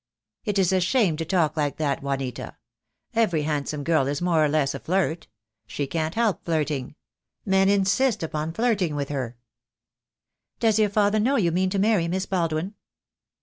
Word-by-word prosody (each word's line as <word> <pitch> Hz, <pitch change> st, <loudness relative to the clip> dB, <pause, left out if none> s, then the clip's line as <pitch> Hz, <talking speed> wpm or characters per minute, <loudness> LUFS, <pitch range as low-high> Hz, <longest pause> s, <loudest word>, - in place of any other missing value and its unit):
"It 205 Hz, -2 st, -1 dB
is 190 Hz, -1 st, +3 dB
a 190 Hz, -, +3 dB
shame 190 Hz, -3 st, +2 dB
to 165 Hz, -, -3 dB
talk 160 Hz, -3 st, +1 dB
like 145 Hz, -2 st, -1 dB
that, 145 Hz, -3 st, -1 dB
Juanita. 135 Hz, -3 st, -4 dB, 0.6 s
Every 210 Hz, -10 st, +1 dB
hand 145 Hz, -2 st, -2 dB
some 150 Hz, -2 st, -4 dB
girl 155 Hz, -4 st, +2 dB
is 140 Hz, +1 st, -1 dB
more 170 Hz, -3 st, +2 dB
or 150 Hz, -, +2 dB
less 145 Hz, -2 st, +1 dB
a -, -, -5 dB
flirt. 175 Hz, -2 st, -1 dB, 0.4 s
She 140 Hz, +6 st, -3 dB
can't 160 Hz, +2 st, -2 dB
help 220 Hz, -5 st, 0 dB
flirting. 150 Hz, -5 st, -2 dB, 0.5 s
Men 195 Hz, 0 st, +3 dB
insist 200 Hz, +3 st, +2 dB
upon 155 Hz, 0 st, -3 dB
flirting 200 Hz, -8 st, 0 dB
with 140 Hz, -1 st, -3 dB
her." 130 Hz, -5 st, -4 dB, 1.2 s
"Does 220 Hz, -2 st, +3 dB
your 210 Hz, -1 st, +3 dB
father 205 Hz, +1 st, +2 dB
know 255 Hz, +6 st, +2 dB
you 175 Hz, -9 st, +2 dB
mean 185 Hz, +2 st, +1 dB
to 200 Hz, -, -2 dB
marry 200 Hz, -4 st, +2 dB
Miss 185 Hz, +2 st, -1 dB
Baldwin?" 170 Hz, 0 st, -1 dB
170 Hz, 175 wpm, -24 LUFS, 150-200 Hz, 1.2 s, is